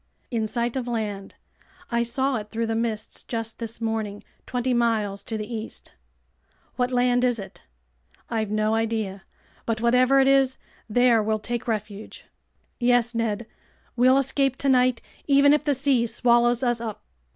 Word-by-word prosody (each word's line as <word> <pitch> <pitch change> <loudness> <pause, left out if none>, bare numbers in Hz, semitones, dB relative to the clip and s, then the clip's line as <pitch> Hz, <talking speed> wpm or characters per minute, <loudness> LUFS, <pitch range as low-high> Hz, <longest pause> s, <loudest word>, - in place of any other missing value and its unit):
"In 225 -2 0
sight 235 +2 -2
of 255 -2 -3
land. 210 -4 -4 0.6
I 235 0 +2
saw 260 +2 0
it 210 -1 -7
through 230 +1 -2
the 225 - -2
mists 225 -2 -3
just 225 -1 -5
this 230 -1 -5
morning, 220 -3 -3 0.2
twenty 250 0 -1
miles 220 -4 0
to 225 - -4
the 215 - -4
east." 225 -1 -7 0.8
"What 250 -1 0
land 245 0 +2
is 245 -2 +2
it?" 195 -2 -10 0.7
"I've 220 -3 -2
no 215 +1 +1
idea, 220 -4 -2 0.4
but 225 -1 0
whatever 250 +3 +4
it 270 - +4
is, 270 -1 +3 0.3
there 240 0 +4
we'll 215 +1 0
take 235 +3 -4
refuge." 210 -2 -5 0.5
"Yes, 245 -1 +2
Ned! 230 -1 -1 0.5
We'll 255 +2 +5
escape 275 0 +1
tonight 255 -3 +2 0.2
even 285 0 +6
if 300 0 +1
the 290 -2 +2
sea 260 -3 +2
swallows 240 +1 +3
us 240 -2 +1
up!" 220 -3 -6
235 Hz, 155 wpm, -24 LUFS, 220-250 Hz, 0.8 s, even